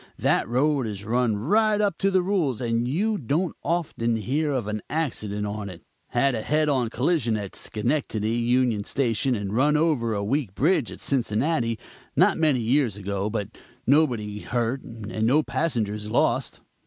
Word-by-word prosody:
That - - +1
road 135 +1 +1
is 100 -1 -6
run 120 -1 +1
right 210 - +2
up 205 -5 0
to 195 - +3
the 185 -2 +2
rules 175 - 0
and 120 -1 0
you 205 - 0
don't 155 +7 -1
often 145 -9 0
hear 140 +9 -1
of 130 -6 -1
an 105 0 -3
accident 105 -10 -2
on 105 0 -4
it. 90 -2 -11 0.2
Had 140 -1 +2
a 110 - -2
head 155 +6 +1
on 130 -5 +1
collision 125 -3 +1
at 100 -2 -6
Schenectady 110 -2 -2
union 120 -2 +1
station 130 +2 0
and 100 -2 -4
run 150 +4 +3
over 140 -9 +1
a 100 - -2
weak 115 -2 -1
bridge 150 -2 +2
at - - -9
Cincinnati, 120 -1 0 0.4
not - - +4
many 150 -6 +3
years 120 -2 +1
ago, 100 0 -2
but 105 -2 -3 0.4
nobody 120 -8 +2
hurt, 120 +3 -1
and 110 -1 -4
no 150 +6 +4
passengers 105 -11 -2
lost. - - +1
120 Hz, 165 wpm, -25 LUFS, 110-150 Hz, 0.4 s, not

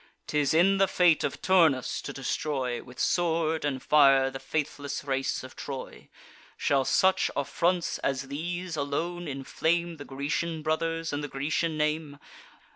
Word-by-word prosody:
'Tis 145 -2 +1
in 190 +5 +4
the 195 - +5
fate 175 -4 +3
of - - -3
Turnus 165 -9 +3
to - - -6
destroy, 135 -2 -2
With 125 0 -13
sword 165 -2 +1
and 135 -3 -2
fire, 135 -3 +5
the 135 - -6
faithless 140 0 -3
race 135 -2 -1
of 130 - -11
Troy. 135 -2 -7 0.5
Shall 135 -2 +2
such 190 +5 +3
affronts 170 +5 0
as 135 0 -1
these 175 +4 -4
alone 165 +4 -2
inflame 160 +5 -1
The 145 - -9
Grecian 150 +4 -3
brothers, 165 0 -1
and 145 +1 -2
the - - -3
Grecian 155 +4 -1
name? 150 -1 -1
150 Hz, 145 wpm, -28 LUFS, 140-170 Hz, 0.5 s, the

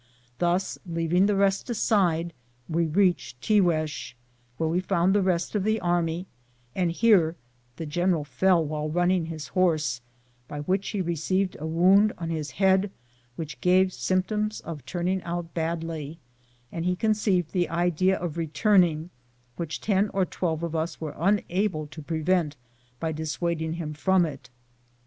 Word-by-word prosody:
Thus, 180 +2 0
leaving 170 +2 +1
the 205 - +2
rest 195 +4 +1
aside, 180 -7 +1 0.3
we 165 0 +1
reached 175 -6 +1
Tiguez, 165 - +1 0.4
where 160 - 0
we 170 +3 +1
found 185 0 +2
the 205 - +3
rest 180 -2 0
of 205 -3 0
the 220 +2 +1
army, 175 -1 0 0.5
and 180 +1 +1
here 175 -4 +4 0.4
the 165 - -5
general 175 +1 +1
fell 175 +2 +2
while 150 0 -3
running 175 +1 +1
his 160 -2 -6
horse, 155 -9 +1 0.5
by 145 - -5
which 190 +6 -1
he 205 - -2
received 185 +3 -1
a 155 - -4
wound 190 +6 +4
on 165 -1 -4
his 155 -2 -3
head 190 +2 +2 0.5
which 150 -6 -7
gave 185 +1 +4
symptoms 210 +3 -1
of 155 -5 -7
turning 180 +3 -1
out 170 -1 -5
badly, 165 -2 -3 0.5
and 165 - -4
he 180 +1 +1
conceived 200 -4 +1
the 180 -2 0
idea 175 +2 +2
of 170 -2 -4
returning, 170 -1 +2 0.4
which 165 -2 -4
ten 205 0 +1
or 190 -1 +3
twelve 165 -2 -2
of 165 -1 -3
us 160 +1 -2
were 155 -2 -5
unable 190 -2 0
to 155 +1 -10
prevent 160 0 0 0.4
by 160 - -1
dissuading 160 +1 -2
him 165 -3 -4
from 185 +3 +3
it. 140 -5 -8
175 Hz, 150 wpm, -26 LUFS, 160-190 Hz, 0.5 s, here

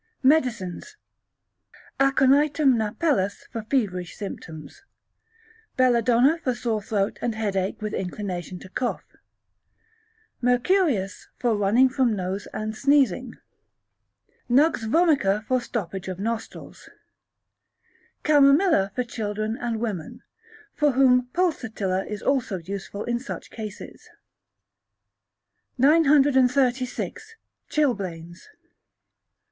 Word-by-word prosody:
Medicines. 260 - 0 1.0
Aconitum 275 +1 +4
napellus 220 - -1
for 230 - -4
feverish 210 -7 -2
symptoms; 180 - -8 1.0
Belladonna 250 +4 +3
for 255 -7 -1
sore 230 -3 -2
throat 200 0 -2
and 235 -2 -2
headache 195 -3 -2
with 215 - -3
inclination 185 -1 -4
to 190 - -12
cough; 245 +5 -3 1.4
Mercurius 245 - +1
for 235 -3 +1
running 210 +6 +4
from 255 -4 +1
nose 190 +1 -4
and 215 0 -4
sneezing; 260 -3 +2 1.1
Nux 285 +7 +5 0.2
vomica 250 - +2
for 255 +1 +1
stoppage 195 -6 -5
of 185 -1 -4
nostrils; 225 +3 -6 1.3
Chamomilla 285 - +4
for 250 - 0
children 215 -2 -3
and 235 -4 -3
women, 205 -9 -5 0.5
for 295 -3 +2
whom 250 -1 +4
Pulsatilla 225 - -1
is 210 -1 -6
also 255 -8 0
useful 195 +3 -6
in 240 0 -2
such 265 - -8
cases. 215 -2 -9 1.7
936. 275 - +2 0.3
Chilblains. 185 - -2
235 Hz, 90 wpm, -24 LUFS, 200-275 Hz, 1.7 s, Nux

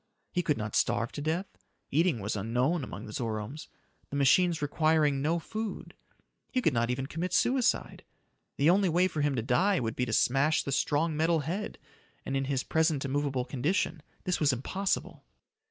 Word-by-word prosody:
He 180 - 0
could 150 -4 0
not 105 -1 -4
starve 115 +4 +1
to 145 - -6
death; 160 +6 -1 0.5
eating 155 - +2
was 105 +2 -2
unknown 125 - 0
among 105 -3 -7
the 105 - -9
Zoromes, 115 +5 -4 0.4
the - - -5
machines 165 +5 +4
requiring 150 -1 +2
no 160 +4 +1
food. 215 +5 -5 0.6
He 255 - +1
could 160 - +2
not 120 0 +1
even 130 +2 -1
commit 165 +6 -4
suicide. 250 -1 +1 0.5
The 150 +4 +5
only 190 0 +3
way 175 +3 +3
for 160 -4 -3
him 145 -1 +1
to 115 - -1
die 180 - +2
would 115 -2 -2
be 125 - -1
to 115 - -2
smash 140 +7 +3
the 140 - -4
strong 150 +4 +1
metal 160 +1 +2
head, 185 +8 -4 0.5
and 135 - -2
in 135 0 0
his 135 -1 -1
present 160 -3 +1
immovable 135 -2 -1
condition, 155 +5 -1 0.2
this 180 - 0
was 145 -2 +4
impossible. 190 +10 -2
145 Hz, 180 wpm, -29 LUFS, 130-170 Hz, 0.6 s, The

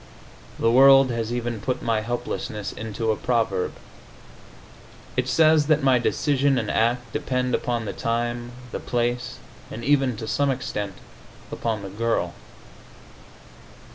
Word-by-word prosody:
The 115 - +2
world 135 +1 +7
has 115 -1 -2
even 120 -2 -3
put 130 +3 -2
my 115 -2 +1
helplessness 110 -2 -4
into 110 +1 -3
a - - +1
proverb. 110 -6 0 1.4
It - - 0
says 155 -2 +4
that 155 -2 +3
my 130 -2 +4
decision 140 +2 +1
and 110 -3 -1
act 120 +1 0
depend 125 -1 -1
upon 120 -2 -1
the - - -4
time, 120 +1 -2 0.2
the - - -4
place 120 0 -2 0.3
and 115 - -7
even 135 -4 +2
to 110 0 -6
some 140 +4 +1
extent, 105 -6 -3 0.6
upon 110 -3 -2
the 100 - -6
girl. 105 -4 -1
120 Hz, 135 wpm, -24 LUFS, 110-130 Hz, 1.4 s, world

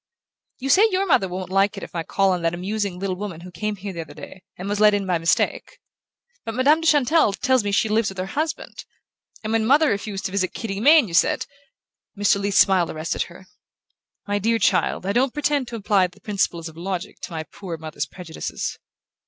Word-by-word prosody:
"You 270 +1 -4
say 395 +10 +6
your 380 0 0
mother 255 - +3
won't 185 0 -6
like 195 +1 +2
it - - -6
if - - -9
I 170 - -2
call 195 +3 +1
on 180 -1 -1
that 165 0 0
amusing 200 +1 -3
little 190 0 -2
woman 185 -4 -6
who 180 +1 -10
came 210 +3 -3
here 200 0 -7
the 170 - -5
other 145 -2 -11
day, 190 - -11 0.2
and 185 - -6
was 205 0 -1
let 210 -1 +6
in 200 -1 -1
by 180 -3 0
mistake; 165 +1 0 0.7
but 225 - -5
Madame 290 +6 +4
de 325 - -1
Chantelle 295 -5 +4
tells 260 +3 +2
me 205 - -1
she 210 +2 +2
lives 215 0 +1
with 195 - -10
her 185 - -2
husband, 310 +10 -4 0.6
and 215 +1 -2
when 225 -1 +2
mother 285 +6 +4
refused 200 -1 -3
to - - -2
visit 185 -2 -1
Kitty 200 -4 -4
Mayne 290 +2 +6
you 170 - -9
said 170 - +3 0.4
" - - -25
Mr. 200 -1 +3
Leath's 200 0 0
smile 185 -4 +4
arrested 155 +1 -3
her. 175 +2 -14 0.8
"My 205 0 0
dear 230 +3 +2
child, 205 - +1
I 200 - 0
don't 250 +2 +1
pretend 290 -3 0
to 235 - -6
apply 200 -3 +2
the 180 - -21
principles 185 -5 -1
of 160 - -11
logic 185 +2 -5
to - - -8
my 160 -1 -4
poor 170 +1 -8
mother's 155 -2 -5
prejudices." 175 -1 -6
200 Hz, 220 wpm, -23 LUFS, 180-225 Hz, 0.8 s, say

